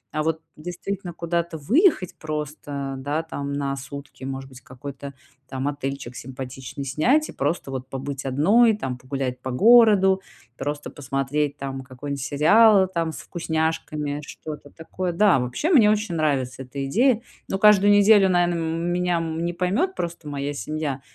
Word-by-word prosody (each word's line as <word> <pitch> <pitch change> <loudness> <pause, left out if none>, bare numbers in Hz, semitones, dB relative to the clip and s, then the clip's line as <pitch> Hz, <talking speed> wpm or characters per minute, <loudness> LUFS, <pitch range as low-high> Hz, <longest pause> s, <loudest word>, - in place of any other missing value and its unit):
А 155 - +1
вот 160 0 -1
действительно 180 +3 -5
куда-то 170 0 -2
выехать 230 - +2
просто, 150 -2 -4
да, 145 +4 -2
там, 140 -3 -5
на 140 -1 -2
сутки, 135 0 -9
может 135 0 -5
быть, 130 -2 -14
какой-то 140 +2 -9 0.4
там 130 +1 -3
отельчик 135 -3 -4
симпатичный 130 +2 -7
снять 245 - +2
и - - -6
просто 140 -1 -2
вот 130 0 -5
побыть 135 +1 -5
одной, 205 - +4
там, 130 -10 -4
погулять 130 -1 -4
по 130 - -5
городу, 200 - +6 0.3
просто 145 +3 -4
посмотреть, 145 +1 -2
там, 135 -1 -5
какой-нибудь 140 +1 -6
сериал, 190 +7 +5
там, 165 -3 -2
с - - -9
вкусняшками, 160 -3 -2
что-то 150 -2 -9
такое. 175 +3 -5
Да, 190 -4 +4
вообще 125 - -1
мне 230 -10 +6
очень 215 -3 0
нравится 135 -5 0
эта 135 +2 -5
идея. 235 - +3 0.3
Но 195 - 0
каждую 205 -1 +6
неделю, 205 -1 +6
наверно, 175 -1 +2
меня 170 +2 0
не 165 +1 -2
поймёт 200 - 0
просто 170 -2 -5
моя 145 0 -3
семья, 145 -2 -3
150 Hz, 150 wpm, -24 LUFS, 135-180 Hz, 0.4 s, городу